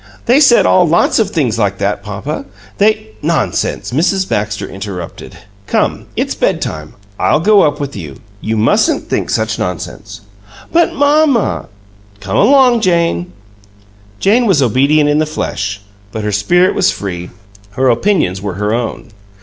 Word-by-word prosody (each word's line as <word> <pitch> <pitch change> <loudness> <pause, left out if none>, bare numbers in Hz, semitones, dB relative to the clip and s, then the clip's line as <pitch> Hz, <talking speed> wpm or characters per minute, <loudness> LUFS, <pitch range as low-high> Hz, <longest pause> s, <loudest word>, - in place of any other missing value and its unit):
"They 250 +4 +4
said 265 -5 +5
all 180 -2 +4
lots 170 +7 +2
of 215 -3 +1
things 125 - -1
like 100 -2 0
that, 100 +1 -2
papa. 105 +9 -5 0.3
They 210 - +2
" 105 - -27
"Nonsense!" - - -2
Mrs. 185 +7 +1
Baxter 105 0 -2
in - - -11
interrupted. 95 -3 -8 0.3
"Come, - - -1
it's - - -1
bedtime. 75 -1 -3 0.2
I'll - - +2
go 205 +4 +4
up 145 -1 +1
with 140 -1 -5
you. 80 -8 -7 0.3
You 110 0 -2
mustn't 110 +2 +1
think - - -1
such - - -1
nonsense." 105 +2 -6 0.5
"But, 340 0 +3
mamma 285 -4 +2 0.3
" 100 0 -29
"Come 95 -1 -4
along, 250 0 +4
Jane!" 170 - 0 0.9
Jane 230 +4 +3
was 185 -7 +3
obedient 140 +4 +3
in 145 +1 +2
the 155 - 0
flesh, 105 -9 -4 0.3
but 110 - -5
her 105 - -1
spirit 175 - +2
was - - +2
free; 90 -2 -5 0.4
her 130 +4 +1
opinions 120 - +1
were 100 -3 -4
her 105 +2 -1
own. 120 0 -4
125 Hz, 160 wpm, -14 LUFS, -, 0.9 s, said